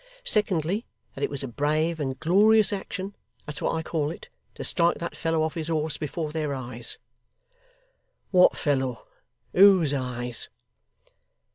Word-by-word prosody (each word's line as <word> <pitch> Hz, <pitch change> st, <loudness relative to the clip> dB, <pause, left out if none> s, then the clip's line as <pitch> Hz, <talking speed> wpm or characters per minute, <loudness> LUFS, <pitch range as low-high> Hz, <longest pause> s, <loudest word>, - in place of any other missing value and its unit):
Secondly, 200 Hz, -, +1 dB, 0.3 s
that 135 Hz, -, -6 dB
it -, -, +1 dB
was 140 Hz, -1 st, -4 dB
a -, -, -3 dB
brave 155 Hz, +6 st, 0 dB
and 135 Hz, -3 st, -3 dB
glorious 210 Hz, +6 st, +4 dB
action 195 Hz, 0 st, -5 dB, 0.3 s
that's 150 Hz, -2 st, -6 dB
what -, -, 0 dB
I 160 Hz, -, -2 dB
call 155 Hz, -2 st, -1 dB
it 165 Hz, -, -9 dB, 0.3 s
to -, -, -6 dB
strike 170 Hz, -2 st, +3 dB
that 170 Hz, -, -5 dB
fellow 165 Hz, -1 st, 0 dB
off 160 Hz, -1 st, -1 dB
his 160 Hz, -2 st, -4 dB
horse 160 Hz, -1 st, 0 dB
before 155 Hz, +1 st, -4 dB
their 150 Hz, -3 st, -2 dB
eyes!' 120 Hz, -2 st, -4 dB, 1.3 s
'What 180 Hz, -2 st, +5 dB
fellow! 130 Hz, -5 st, -1 dB, 0.5 s
Whose 185 Hz, -6 st, +6 dB
eyes! 125 Hz, -3 st, -2 dB
155 Hz, 145 wpm, -26 LUFS, 140-175 Hz, 1.3 s, Whose